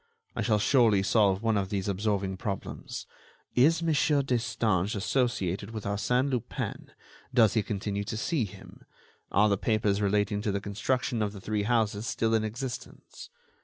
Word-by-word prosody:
I - - -1
shall 110 -3 +2
surely 110 -3 +4
solve 100 -1 +3
one 110 -2 +2
of 95 -1 -1
these 100 -2 -2
absorbing 100 -1 -1
problems: 100 0 -5 0.5
Is 160 +7 +4
Mon. 165 -1 +2 0.3
Destange 110 -6 0
associated 100 -3 -1
with 110 -2 -6
Arsène 125 +7 0
Lupin? 125 -4 -4 0.4
Does 115 -4 +5
he 110 - +3
continue 100 -1 -3
to 110 - -4
see 135 +1 0
him? 95 0 -13 0.5
Are 105 +2 +4
the 100 -2 +1
papers 105 -2 +1
relating 105 0 +1
to 105 - -1
the 100 - -1
construction 110 +4 -1
of 105 -1 -1
the 100 - -8
three 105 +2 -2
houses 110 -2 +1
still 115 0 0
in 110 -1 +2
existence? 125 +3 -7
105 Hz, 160 wpm, -28 LUFS, 100-115 Hz, 0.5 s, Does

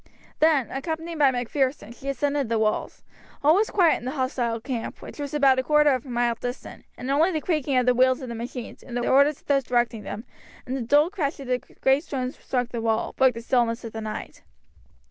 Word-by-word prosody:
Then, 305 -6 +3
accompanied 320 +4 -4
by 285 -2 +6
Macpherson, 255 -1 -1
she 270 +3 -7
ascended 280 -1 -1
the 230 - +1
walls. 215 -1 -1 0.4
All 300 +2 +6
was 420 +5 +2
quiet 350 -5 +3
in - - -11
the - - -1
hostile 245 -3 -1
camp, 235 -1 -5
which - - -11
was 285 -2 -4
about 275 -3 +4
a - - 0
quarter 300 +1 +4
of 255 0 -1
a - - -9
mile 240 -1 +1
distant, 245 +3 -7
and 255 +2 -4
only 310 +6 +4
the 320 -4 -1
creaking 300 -5 0
of 250 - +3
the 250 - +4
wheels 255 +1 +3
of 260 - -7
the 235 - -5
machines, 235 +1 -7
the 245 -1 -4
orders 280 +2 +4
of - - -37
those 275 -1 +2
directing 240 -2 0
them, 215 +3 -7 0.4
and 255 - -3
the 270 - -3
dull 290 +8 +3
crash 315 -8 -2
as 275 - -7
the 250 0 0 0.2
great 270 +3 +3
stones 260 -5 -4
struck 245 -2 -2
the 235 -2 -4
wall, 225 -1 0
broke 260 -3 +4
the 230 - -7
stillness 235 -1 +1
of 230 - -7
the 220 - -5
night. 215 0 -6
260 Hz, 225 wpm, -25 LUFS, 240-285 Hz, 0.4 s, by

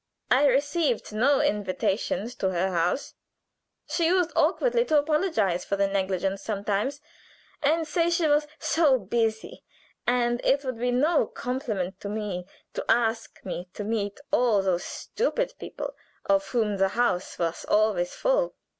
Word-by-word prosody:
I 275 +3 +5
received 280 -3 +1
no 265 +6 +3
invitations 205 +2 -1
to 190 - 0
her 185 +1 0
house. 175 +9 0 0.7
She 325 +2 0
used 355 -1 +2
awkwardly 485 -1 +3
to 310 - +3
apologize 290 - +1
for 200 - -1
the 200 0 +2
negligence 195 0 -1
sometimes, 210 +7 -2 0.6
and 315 +2 +2
say 335 0 +1
she 340 -1 +1
was 295 0 +3
so 310 -7 +3
busy, 220 +1 -2 0.4
and 240 0 +2
it 280 +1 +2
would 255 -3 -3
be 245 +1 0
no 290 +6 +2
compliment 215 -8 -3
to 200 - -6
me 200 -4 -4 0.3
to - - -3
ask 225 -1 +1
me 180 -1 -5
to 210 - -4
meet 205 0 -2
all 240 -9 +3
those 180 -2 0
stupid - - -2
people - - -6 0.3
of 195 0 +2
whom 215 -2 0
the 195 0 +3
house 190 -7 0
was 170 -1 -2
always 210 -5 +2
full. - - +1
225 Hz, 145 wpm, -26 LUFS, 195-290 Hz, 0.7 s, I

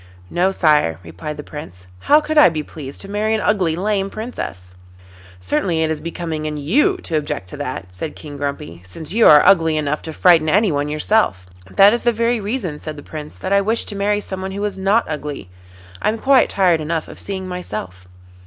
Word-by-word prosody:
'No, 180 +2 +2
sire,' 150 - +2
replied 85 - -7
the 150 - -7
Prince. 120 - -9
'How 295 - +5
could 310 +1 -3
I 300 -10 +8
be 155 -2 -3
pleased 140 -3 -9
to 195 - -9
marry 210 +2 0
an - - 0
ugly, 185 -6 +1
lame 195 +1 -1
Princess?' 95 - -7 0.7
'Certainly 160 - 0
it 160 - 0
is 155 - -2
becoming 165 -2 -4
in 150 -1 -4
you 280 - +2
to 165 - -3
object 145 -12 -3
to - - -9
that,' 90 +1 -6
said 150 - -6
King 145 -2 -10
Grumpy, 140 - -5
'since 145 - -8
you 230 +1 +5
are 150 -1 +8
ugly 165 -5 +4
enough 150 0 -1
to 160 - -7
frighten 160 -1 +4
anyone 155 -7 +2
yourself.' 150 - +1 0.2
'That 195 - +6
is 235 - 0
the 240 - +3
very 235 +1 0
reason,' 200 - -3
said 155 -1 -7
the 145 - -10
Prince, 150 -1 -8
'that 185 - -2
I 200 - +5
wish 220 +3 0
to 205 - -5
marry 205 +1 0
someone 190 -1 -5
who 200 +1 -2
is 205 - -3
not 195 +4 +2
ugly. 150 -10 -6 0.5
I - - +2
am 220 - -1
quite 265 +2 +4
tired 180 -5 +2
enough 160 +1 -2
of - - -11
seeing 190 -2 -5
myself. 105 - -6
165 Hz, 210 wpm, -19 LUFS, 150-205 Hz, 0.7 s, I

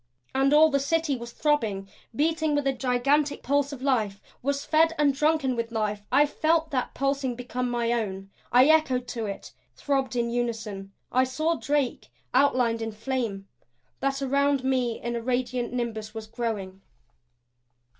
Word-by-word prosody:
And 270 +1 +3
all 310 +1 +6
the 280 - +2
City 310 +1 0
was 235 -1 -7
throbbing, 220 -12 0 0.3
beating 315 +1 +1
with 290 -1 0
a 270 - +2
gigantic 275 +3 +1
pulse 285 +1 +1
of 265 -2 -8
life 220 -8 +1 0.2
was 280 +2 -1
fed 325 +1 +3
and 290 -2 +3
drunken 300 -2 +1
with 230 0 -3
life. 210 -2 -1
I 280 +3 +5
felt 315 +2 +1
that 255 -3 -2
pulsing 275 -2 0
become 250 0 -3
my 235 -1 0
own; 195 -4 -3 0.2
I 250 +2 +7
echoed 280 -5 +3
to 225 -3 -3
it; 200 - -7 0.2
throbbed 270 -4 -1
in 235 -1 0
unison. 220 -5 -3 0.2
I 255 - +4
saw 310 +6 0
Drake 280 -1 -1 0.3
outlined 250 -4 +3
in 225 0 -3
flame; 215 -3 -3 0.5
that 275 0 -1
around 280 0 +2
me 255 -3 0
a 235 0 -2
radiant 245 0 -1
nimbus 225 -3 -4
was 220 -1 -5
growing. 215 -5 -4
255 Hz, 155 wpm, -26 LUFS, 230-280 Hz, 0.5 s, I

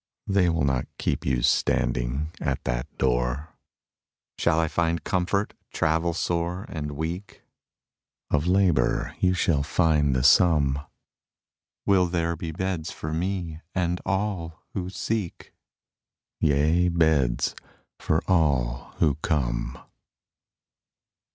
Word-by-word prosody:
They 95 -3 +3
will 80 -3 +1
not 65 -3 0
keep - - -2
you 60 -2 +1
standing 60 +6 +1
at - - -1
that - - -2
door. 60 +4 0 0.9
Shall 80 - +3
I 80 - +2
find 85 0 0
comfort, 95 +4 0 0.2
travel 80 +1 +1
sore 85 +3 -1
and 75 -3 -4
weak? 85 +7 -5 0.9
Of 75 +2 +1
labor 90 -9 +2
you 90 0 +3
shall 85 -5 +2
find 75 -2 +2
the 65 - +1
sum. 70 -5 +5 1.1
Will 95 -2 +4
there 85 -1 -1
be 80 0 -5
beds 85 -1 -3
for 80 0 -5
me 85 -2 -3
and 90 -1 0
all 95 -4 -2
who 90 -2 -3
seek? 100 -1 -4 0.9
Yea, 80 +5 +3
beds 80 -8 +2 0.5
for - - 0
all 70 -9 +1
who 75 -3 +2
come. - - -1
80 Hz, 110 wpm, -26 LUFS, 70-90 Hz, 1.1 s, sum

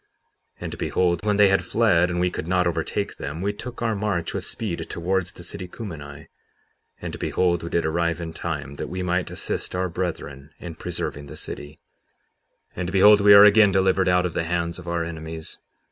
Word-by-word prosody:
57:34 - - -26
And - - -5
behold, 85 -1 0
when 105 -1 +2
they 105 -1 +6
had 95 - +2
fled 90 -6 +3
and 85 0 -2
we 90 0 +1
could 80 - -5
not 90 0 +2
overtake 85 - -2
them, 75 +4 -5
we 100 +3 -1
took 120 +3 -7
our 115 -1 +1
march 100 -4 -2
with - - -3
speed 105 -7 -3
towards 90 +1 -1
the 90 - -12
city 95 0 -7
Cumeni; 80 -9 -8 0.7
and - - -6
behold, 85 -2 +1
we 85 - -5
did 85 - 0
arrive 85 +1 0
in 80 -1 -6
time 70 - -4
that - - -4
we 90 +2 -4
might 90 0 0
assist - - -3
our 90 0 -1
brethren 80 -5 -5
in 85 -2 -8
preserving 80 -3 -4
the 75 +2 -9
city. 75 +1 -7 0.9
57:35 - - -30
And 90 0 -3
behold, 100 +2 +7
we 100 0 +8
are 100 - +10
again 105 0 +7
delivered 95 0 +2
out 90 0 +3
of 90 - -2
the 85 - -1
hands 85 0 -2
of 90 - -11
our 85 -1 -1
enemies. 80 -1 -7
90 Hz, 205 wpm, -24 LUFS, 85-95 Hz, 0.9 s, are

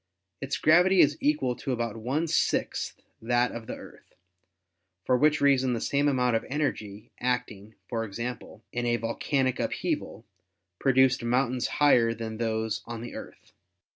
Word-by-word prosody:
Its 135 0 -2
gravity 180 +4 +5
is 145 -2 +5
equal 140 -4 +1
to 135 - -4
about 115 -3 -2
one 130 +9 -1
sixth 165 - -1 0.2
that 120 +2 +1
of 115 -1 -8
the - - -4
Earth, - - -15 0.9
for 125 - +3
which 150 +4 +3
reason 130 -3 +3
the 115 - -1
same 140 +5 +1
amount 125 -4 +2
of 115 - 0
energy 110 -8 -3
acting, 115 -4 -3
for 115 -2 -2
example, 115 +1 -6
in 120 0 -2
a 120 0 +2
vol 115 0 -3
canic 130 -3 0
upheaval, - - -3 0.5
produced 130 -2 +3
mountains 125 +1 +1
higher 120 -6 +4
than 110 -1 -6
those 110 -1 -1
on 115 -1 -6
the 120 - -7
Earth. - - -11
125 Hz, 155 wpm, -27 LUFS, 115-135 Hz, 0.9 s, gravity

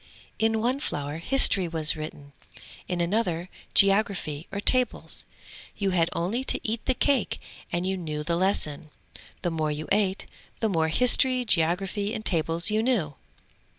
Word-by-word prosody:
In 220 0 +2
one 250 +4 0
flower 145 - -4
history 195 -3 +4
was 160 -2 +1
written, 150 -2 -8 0.5
in 180 -1 -2
another 175 -2 -1 0.3
geography 195 -6 +2
or 200 - -3
tables; 250 +3 +3 0.5
you 200 -2 0
had 170 -2 +2
only 200 +10 -1
to - - +1
eat 220 +1 -2
the 260 - +2
cake 275 -3 +1 0.3
and 175 +1 -1
you 190 +1 0
knew 155 -4 -4
the 170 +2 -1
lesson. 170 -5 -1 0.5
The 175 - 0
more 155 -1 -1
you 150 +1 -4
ate, 200 -2 +1 0.3
the 220 - +1
more 165 -4 +1
history, 250 +6 +2
geography 195 +3 0
and 215 - -6
tables 165 +2 +2
you 215 +1 +2
knew. 220 - 0
185 Hz, 150 wpm, -26 LUFS, 160-220 Hz, 0.5 s, history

